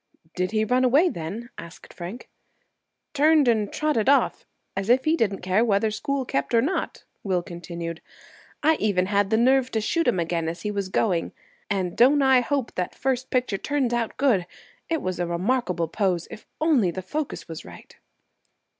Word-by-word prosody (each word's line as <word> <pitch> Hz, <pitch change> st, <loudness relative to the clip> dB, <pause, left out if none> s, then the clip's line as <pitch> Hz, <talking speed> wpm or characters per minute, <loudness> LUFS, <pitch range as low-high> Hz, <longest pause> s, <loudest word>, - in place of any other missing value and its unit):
"Did 185 Hz, 0 st, -1 dB
he 215 Hz, 0 st, +1 dB
run 250 Hz, +3 st, +2 dB
away 285 Hz, +8 st, +4 dB
then?" 205 Hz, -, -6 dB
asked 170 Hz, +1 st, -12 dB
Frank. 185 Hz, +8 st, -8 dB, 0.9 s
"Turned 300 Hz, -1 st, +4 dB
and 215 Hz, -4 st, +2 dB
trotted 300 Hz, -7 st, +1 dB
off, 280 Hz, -, +2 dB, 0.3 s
as 195 Hz, +2 st, -3 dB
if 260 Hz, +2 st, +4 dB
he 315 Hz, +1 st, +3 dB
didn't 200 Hz, -, -1 dB
care 185 Hz, +5 st, +2 dB
whether 215 Hz, -1 st, +2 dB
school 270 Hz, +5 st, -2 dB
kept 140 Hz, -, -1 dB
or 230 Hz, -, +5 dB
not," 320 Hz, +7 st, -2 dB, 0.2 s
Will 185 Hz, -3 st, 0 dB
continued. 170 Hz, -1 st, -7 dB, 0.6 s
"I 315 Hz, +1 st, +4 dB
even 195 Hz, -4 st, +1 dB
had 200 Hz, 0 st, +1 dB
the 220 Hz, -, +2 dB
nerve 260 Hz, +2 st, +3 dB
to 220 Hz, -, +1 dB
shoot 330 Hz, +10 st, 0 dB
him 185 Hz, -, +2 dB
again 165 Hz, -1 st, -1 dB
as 170 Hz, -, -7 dB
he 210 Hz, -, -1 dB
was 200 Hz, -2 st, -3 dB
going. 185 Hz, -3 st, 0 dB, 0.4 s
And 185 Hz, -4 st, -1 dB
don't 275 Hz, +4 st, +5 dB
I 265 Hz, -1 st, +6 dB
hope 270 Hz, 0 st, -2 dB
that 180 Hz, -1 st, -3 dB
first 260 Hz, -1 st, -1 dB
picture 250 Hz, -6 st, 0 dB
turns 275 Hz, -3 st, -1 dB
out 235 Hz, -2 st, -2 dB
good! 230 Hz, -11 st, +2 dB, 0.4 s
It 325 Hz, -2 st, -1 dB
was 185 Hz, -1 st, -3 dB
a 175 Hz, -, -1 dB
remarkable 180 Hz, -1 st, 0 dB
pose, 180 Hz, -1 st, -1 dB
if 220 Hz, -, -11 dB
only 295 Hz, -, +3 dB
the 185 Hz, +2 st, -5 dB
focus 290 Hz, -, -4 dB
was 165 Hz, -1 st, -7 dB
right." -, -, -13 dB
215 Hz, 180 wpm, -24 LUFS, 180-260 Hz, 0.9 s, I